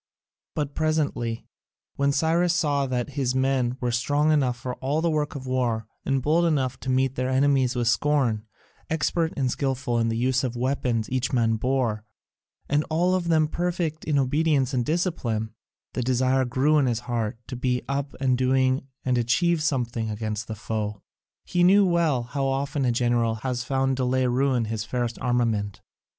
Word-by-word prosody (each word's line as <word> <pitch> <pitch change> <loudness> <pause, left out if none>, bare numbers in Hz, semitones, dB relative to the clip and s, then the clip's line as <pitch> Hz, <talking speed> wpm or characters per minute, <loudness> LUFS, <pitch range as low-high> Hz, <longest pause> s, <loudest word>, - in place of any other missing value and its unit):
But 145 -2 -2
presently, 150 -7 -1 0.5
when 140 0 +2
Cyrus 165 +4 +2
saw 145 -4 +1
that 125 +1 -2
his 130 -2 -1
men 130 -2 +1
were 125 -1 -1
strong 145 +6 +1
enough 130 -5 +2
for 125 +1 -5
all 140 +4 -1
the 165 0 +1
work 150 -1 -1
of 135 -2 -6
war, 120 -4 0 0.2
and 135 -2 0
bold 165 +4 +3
enough 130 -6 0
to 130 - -6
meet 130 0 +2
their 130 0 -2
enemies 130 -1 +2
with 120 -1 0
scorn, 120 -5 +1 0.4
expert 160 +1 0
and 130 -3 +1
skilful 130 -3 -1
in 115 0 +1
the 115 - -1
use 130 +3 +1
of 125 -2 -1
the 120 - -6
weapons 125 -3 0
each 130 -1 0
man 115 -3 +2
bore, 120 -3 0 0.6
and 145 +1 +2
all 175 +3 +2
of 180 -2 0
them 160 -2 +3
perfect 170 -1 -2
in 150 -2 +1
obedience 140 0 +1
and 125 -2 0
discipline, 130 - -1 0.4
the - - -2
desire 130 +1 +2
grew 140 +5 +2
in 135 - +2
his 120 -1 -1
heart 115 -3 -2
to 130 - -6
be 125 0 -1
up 140 0 -3
and 130 -2 +1
doing 130 +1 +2 0.2
and 125 -1 +2
achieve 165 +8 +2
something 120 -7 -1
against 110 0 -4
the 110 - -5
foe. 105 -1 -4 0.4
He 175 -1 +1
knew 195 +3 +6
well 165 -8 +2
how 135 +3 -2
often 135 +1 -1
a 125 - +3
general 120 -1 +1
has 125 -2 -1
found 135 0 0
delay 130 0 +1
ruin 125 -1 +1
his 110 -1 -3
fairest 120 0 -3
armament. 115 -5 0
130 Hz, 180 wpm, -25 LUFS, 120-145 Hz, 0.6 s, knew